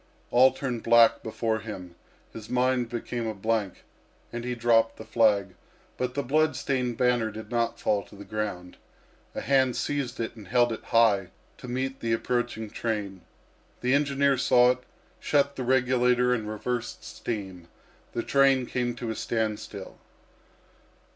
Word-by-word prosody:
All 130 +2 +6
turned 130 -3 -4
black 115 -1 +5
before 110 0 -2
him, 95 -5 -8 0.4
his 110 -1 -9
mind 125 -1 +1
became 120 0 -4
a 110 - -3
blank, 105 -1 -2 0.5
and 120 0 -4
he 125 0 -3
dropped 115 -1 +3
the 110 - -9
flag; 100 -5 +2 0.4
but 125 0 -3
the 140 - -1
blood 155 +3 +2
stained 125 -4 -1
banner 125 -3 +2
did 110 +2 -9
not 120 -1 0
fall 105 -1 +1
to - - -16
the 100 0 -10
ground. 100 -5 -4 0.6
A - - -3
hand 130 -2 +2
seized 135 -4 -2
it 115 0 -3
and 105 -4 -12
held 120 +2 +3
it - - -8
high 110 -5 +3 0.3
to - - -9
meet 130 +2 -3
the 115 -1 -1
approaching 120 -1 -1
train. 105 -5 -3 0.6
The 125 +1 +2
engineer 140 -1 +2
saw 125 -1 +5
it, 125 - -3 0.4
shut 140 -1 +1
the - - -5
regulator, 125 -1 +3
and 110 -3 -2
reversed 120 +3 -4
steam. 95 -6 -6 0.5
The 115 - -2
train 135 -2 +3
came 120 -1 -2
to 120 -2 -4
a - - -4
standstill. 105 -3 -3
120 Hz, 155 wpm, -27 LUFS, 110-125 Hz, 0.6 s, All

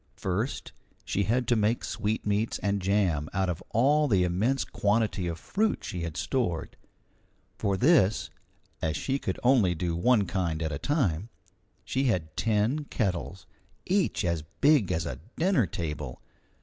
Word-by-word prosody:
First, 100 +8 -3 0.3
she 100 - 0
had 120 +3 +1
to 120 - +4
make 110 +2 +1
sweetmeats 105 0 -1
and 100 -1 0
jam 90 -6 +1
out 95 -1 +1
of 85 - -3
all 145 +6 +3
the 95 -8 +3
immense 105 +10 +1
quantity 105 -3 0
of 85 -1 -3
fruit 215 - -1
she 90 -4 -4
had 85 -1 -4
stored. 100 - -1 0.8
For 100 -1 0
this, 125 - +3 0.5
as 80 -1 -1
she 135 - -1
could 95 - -3
only 120 -9 +4
do 85 +1 -2
one 105 +4 +3
kind 85 -4 -1
at 80 - -2
a 70 - -3
time, 115 - 0 0.6
she 135 +1 0
had 90 -10 0
ten 115 +7 +1
kettles, 95 -6 -2 0.4
each 185 - +1
as 85 -2 0 0.2
big 140 - +4
as 80 0 -1
a - - -5 0.2
dinner 165 - +3
table. 75 -7 -5
100 Hz, 150 wpm, -28 LUFS, 85-125 Hz, 0.8 s, to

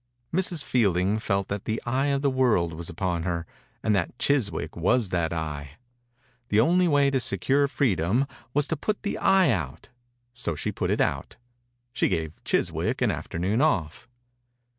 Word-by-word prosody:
Mrs. 175 -3 0
Fielding 100 -3 +2
felt 100 -3 -1
that 100 -1 -4
the 110 +1 -1
eye 130 +3 +1
of 140 0 0
the 140 - +4
world 120 -11 +2
was 80 +1 -6
upon 90 0 -2
her, 85 -1 -2 0.4
and 110 -1 +2
that 95 +5 -1
Chiswick 130 -9 0
was 95 +4 +1
that 85 -3 0
eye. 75 -3 -5 0.7
The 105 - +3
only 175 +9 +4
way 145 -3 +3
to 135 - +2
secure 130 +7 +1
freedom 115 - +1 0.3
was 145 +2 +2
to 160 - +1
put 210 +8 -3
the 205 - -2
eye 190 -7 +4
out, 75 - -4 0.4
so 120 -10 -3
she - - -3
put - - -2
it - - +1
out. - - -1 0.6
She - - +1
gave 80 -3 -3
Chiswick - - 0
an - - +3
afternoon 95 +8 -1
ofF. 95 - 0
105 Hz, 165 wpm, -26 LUFS, 85-140 Hz, 0.7 s, the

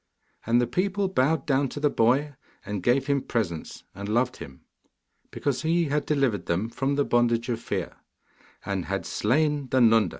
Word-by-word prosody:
And 120 +1 +4
the 120 - +2
people 195 - 0
bowed 150 -2 +1
down 135 -1 +1
to 145 - -6
the 150 -1 +2
boy 135 +6 +2 0.3
and 105 -2 -4
gave 125 +6 +2
him 140 -1 +1
presents, 90 -12 -3
and 100 +1 -7
loved 125 +3 +1
him, 65 -1 -11 0.7
because 130 -3 -2
he 165 0 +1
had 150 +1 -1
delivered 130 - 0
them 95 +7 0
from 135 +3 -1
the 145 0 +1
bondage 120 0 +1
of 115 -2 -1
fear, - - -4 0.7
and 95 -3 -2
had 95 +4 -3
slain 145 +4 +1
the 130 - +2
Nunda. 115 -5 +5
125 Hz, 175 wpm, -26 LUFS, 110-145 Hz, 0.7 s, Nunda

